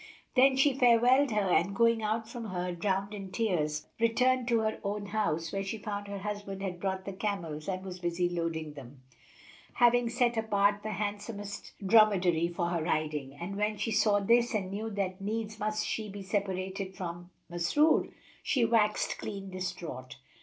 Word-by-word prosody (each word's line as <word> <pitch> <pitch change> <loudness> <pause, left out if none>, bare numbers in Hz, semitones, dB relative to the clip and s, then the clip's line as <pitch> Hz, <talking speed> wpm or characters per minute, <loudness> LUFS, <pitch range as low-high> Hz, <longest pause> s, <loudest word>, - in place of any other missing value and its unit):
Then 265 +1 +6
she 270 +1 +4
farewelled 250 +2 +5
her 210 -4 +1
and 195 +1 +2
going 230 +1 +3
out 220 +1 -1
from 235 0 -7
her, 180 -3 -3
drowned 195 +3 -1
in 195 -2 -7
tears, 155 -9 0
returned 250 +2 +2
to 230 -2 +3
her 220 0 -1
own 205 0 -2
house, 195 -6 -1
where 195 0 -1
she 195 +3 -4
found 205 -1 -5
her 200 0 -5
husband 200 -1 -5
had 180 -3 -4
brought 190 0 -2
the 195 - -5
camels 175 -7 -3
and 185 0 -3
was 185 -1 -7
busy 175 0 0
loading 165 -3 -3
them, 135 -2 -12 0.7
having 240 -1 +4
set 240 -1 +1
apart 205 -2 +2
the 215 0 -4
handsomest 205 0 -5
dromedary 190 -6 +5
for 175 0 -2
her 170 -2 -1
riding, 155 -4 -2
and 180 +6 -6
when 210 +1 0
she 210 +2 -2
saw 205 -1 +3
this 235 +3 +3
and 190 -3 -2
knew 215 +3 -3
that 195 -2 -3
needs 215 +1 -3
must 215 0 -1
she 215 -1 -3
be 200 0 -7
separated 190 -1 -3
from 175 -1 -6 0.2
Masrur, 175 - +2 0.3
she 250 -6 +2
waxt 220 -2 +1
clean 195 -2 -6
distraught. 160 -9 -5
200 Hz, 175 wpm, -30 LUFS, 180-220 Hz, 0.7 s, Then